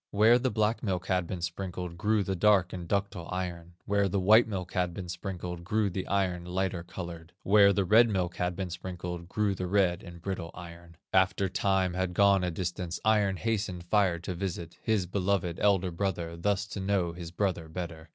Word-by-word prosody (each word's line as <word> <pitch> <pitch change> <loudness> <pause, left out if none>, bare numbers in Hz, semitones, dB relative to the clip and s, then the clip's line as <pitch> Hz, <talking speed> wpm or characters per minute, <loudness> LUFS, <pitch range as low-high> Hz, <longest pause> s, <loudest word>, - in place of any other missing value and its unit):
Where 110 +4 +5
the 130 +1 +1
black 110 +1 0
milk 95 -4 -2
had 90 -3 0
been 85 -1 -5
sprinked, 90 0 -4
Grew 105 +3 +1
the 95 0 -2
dark 95 -1 +3
and 90 -2 -6
ductile 100 -3 -2
iron; 90 -2 -4
Where 100 -1 +2
the 100 - 0
white 110 +5 +6
milk 95 -4 -4
had 90 -2 0
been 95 -2 -6
sprinkled, 90 -1 -5
Grew 105 +2 0
the 95 +1 -4
iron, 95 -3 0
lighter 90 0 -2
colored; 85 -1 -8
Where 100 0 +6
the 100 -1 +1
red 115 +5 +6
milk 90 -4 -1
had 90 0 -1
been 95 -1 -4
sprinkled, 90 -1 -6
Grew 105 0 +1
the 90 -1 -4
red 95 -2 +2
and 85 -2 -11
brittle 90 -2 -4
iron. 85 0 -11 0.2
"After 95 +1 +3
Time 95 -1 +1
had 90 -1 -2
gone 100 -1 +5
a 90 - 0
distance, 90 0 -4
Iron 105 -3 +3
hastened 105 -5 -2
Fire 90 -1 +2
to 85 +2 -5
visit, 85 -2 -5
His 110 -5 +1
beloved 90 -1 -1
elder 95 -3 +2
brother, 85 -2 -2
Thus 100 +3 0
to - - -5
know 95 -3 0
his 85 -1 -7
brother 90 -2 -2
better. 80 -1 -6
90 Hz, 195 wpm, -29 LUFS, 85-100 Hz, 0.2 s, white